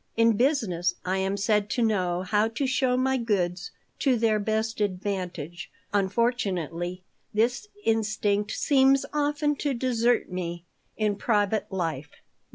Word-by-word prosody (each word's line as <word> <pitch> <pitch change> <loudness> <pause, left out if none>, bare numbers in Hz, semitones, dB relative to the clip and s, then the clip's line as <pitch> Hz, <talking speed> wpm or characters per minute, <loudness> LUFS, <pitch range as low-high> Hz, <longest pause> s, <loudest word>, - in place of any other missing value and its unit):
In 230 -1 +4
business 200 - +1
I 185 +1 0
am 190 +1 -1
said 210 0 +1
to 245 - 0
know 185 -5 +1
how 210 +3 +2
to 230 +5 -2
show 255 -1 +1
my 265 +1 +2
goods 185 -6 -1 0.3
to 260 -3 +3
their 220 -2 +2
best 220 +1 -1
advantage. 180 -4 -3 0.2
Unfortunately, 190 - -1 0.3
this 245 - +1 0.2
instinct 215 -2 +1
seems 270 -1 +3
often 295 0 +1
to 280 -2 -1
desert 240 -1 +1
me 175 -1 -4 0.3
in 210 -2 0
private 210 -1 0
life. 165 -6 -3
210 Hz, 130 wpm, -26 LUFS, 185-240 Hz, 0.3 s, In